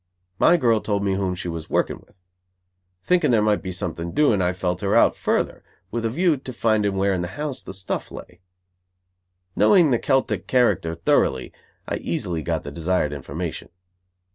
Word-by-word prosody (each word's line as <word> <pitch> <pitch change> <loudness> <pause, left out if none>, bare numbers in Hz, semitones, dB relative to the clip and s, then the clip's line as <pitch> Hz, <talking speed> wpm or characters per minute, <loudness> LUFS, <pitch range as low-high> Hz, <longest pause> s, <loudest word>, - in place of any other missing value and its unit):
My 175 - +5
girl 115 -7 +2
told 100 -1 -1
me 100 -1 +1
whom 95 -1 -1
she 90 - -6
was 85 -2 -6
working - - 0
with. 90 0 -29 0.8
Thinking 180 -4 +2
there 115 -3 +4
might 105 -1 +2
be 95 -1 -5
something 85 -2 -4
doing 130 -10 +3
I 90 0 +2
felt 90 -1 -3
her 100 -1 +1
out - - +5
further, - - -1 0.3
with 115 0 -2
a - - +1
view 165 +5 +2
to 130 0 -8
finding 110 -4 +1
where 95 +1 +1
in 90 - -1
the 90 - -3
house 150 -3 -3
the - - -8
stuff 95 0 -4
lay. 90 +1 -11 1.1
Knowing 175 -8 +5
the 120 - +2
Celtic 135 -1 0
character 100 -10 +2
thoroughly, 65 -5 +1 0.3
I - - -2
easily 85 -3 -3
got 75 - -2
the - - -7
desired 85 -3 -1
information. 75 +4 -6
95 Hz, 180 wpm, -23 LUFS, 90-120 Hz, 1.1 s, My